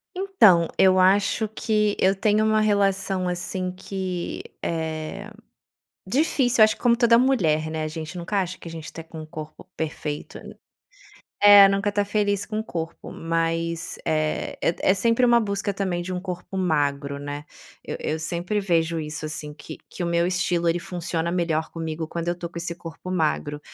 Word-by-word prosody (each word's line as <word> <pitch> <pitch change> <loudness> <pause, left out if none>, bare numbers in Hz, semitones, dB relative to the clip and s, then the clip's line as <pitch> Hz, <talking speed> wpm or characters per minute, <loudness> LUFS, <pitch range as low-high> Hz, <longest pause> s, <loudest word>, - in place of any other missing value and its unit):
Então, 220 - +5
eu 185 0 +5
acho 200 +3 +3
que 210 -1 0
eu 190 +1 +4
tenho 215 +1 +2
uma 215 0 +3
relação, 195 -3 +1
assim, 180 +1 -3
que 185 -1 -5 0.2
é 160 +5 -4 0.8
difícil, 250 0 +2
acho 215 0 +5
como 240 -1 +3
toda 235 -1 +5
mulher, 165 - +2
né, 155 0 -2
a 155 - -2
gente 160 +2 -6
nunca 180 +4 -2
acha 180 0 -6
que - - -9
a - - -8
gente 160 -1 -8
tá 165 - -7
com 160 -1 -9
o - - -10
corpo 155 -1 -9
perfeito 150 -1 -4 1.0
é, 205 -1 +10
nunca 195 +1 0
tá 205 0 +2
feliz 205 -1 0
com 215 -1 -3
o - - -6
corpo, 165 -5 -6
mas 165 0 -2
é 155 -1 -1
é 170 - +2
é 190 - +4
sempre 230 +5 +2
uma 240 -1 +5
busca 200 -2 -1
também 185 -3 -1
de 185 - -6
um 180 - -2
corpo 180 +1 -6
magro, 145 -5 0
né? 145 +1 -6 0.4
Eu - - -4
eu 155 - -2
sempre 170 +5 -2
vejo 170 -4 +1
isso 155 0 -5
assim 150 -1 -5
que 155 +1 -10
que 180 - -6
o - - -1
meu 170 0 +2
estilo, 180 -2 0
ele 170 +1 +2
funciona 170 -1 -3
melhor 165 -3 -1
comigo 160 -1 -4
quando 170 +1 -4
eu 175 - +1
tô 175 -1 -6
com 170 - -18
esse 170 0 -4
corpo 165 +1 -9
magro. 150 -4 -1
175 Hz, 180 wpm, -24 LUFS, 160-200 Hz, 1.0 s, é